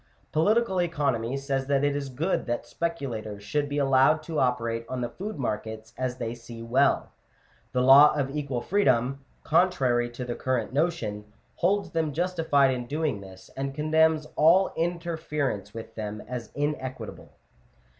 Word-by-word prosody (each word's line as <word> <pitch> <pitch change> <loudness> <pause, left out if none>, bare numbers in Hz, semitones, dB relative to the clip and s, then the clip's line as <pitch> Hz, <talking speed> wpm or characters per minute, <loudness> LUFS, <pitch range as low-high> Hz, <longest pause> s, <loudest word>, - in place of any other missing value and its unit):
Political 190 +3 +2
economy 140 -7 0
says 135 -1 -2
it 140 0 +2
is 145 -1 0
good 155 +8 -1
that 120 0 -2
speculators 120 -10 -4
should 145 +8 -1
be 145 - -2
allowed 135 +2 +4
to 160 -1 -3
operate 115 -2 0
on 130 -1 -3
the 120 - -2
food 205 0 -6
markets 110 -3 -4
as 130 -1 -3
they 115 -2 -3
see 115 -1 -10
well: 130 +4 +2 0.6
the 125 +1 +1
law 140 +3 +9
of 140 -1 -2
equal 140 -5 -2
freedom 135 -8 +1 0.2
(oontrary 130 -9 +2
to 125 +1 -6
the 120 - -3
current 125 -2 -2
notion) 110 -10 -1 0.3
holds 200 +4 +1
them 160 -3 -1
justified 165 -5 +2
in 125 -1 -5
doing 150 -7 -1
this, 95 -1 -13
and 135 0 -3
condemns 155 +1 +3
all 175 +5 +5
interference 160 - -2
with 115 +1 -9
them 105 -1 -5
as 120 -1 -5
inequitable. 130 -5 -4
135 Hz, 150 wpm, -27 LUFS, 120-155 Hz, 0.6 s, law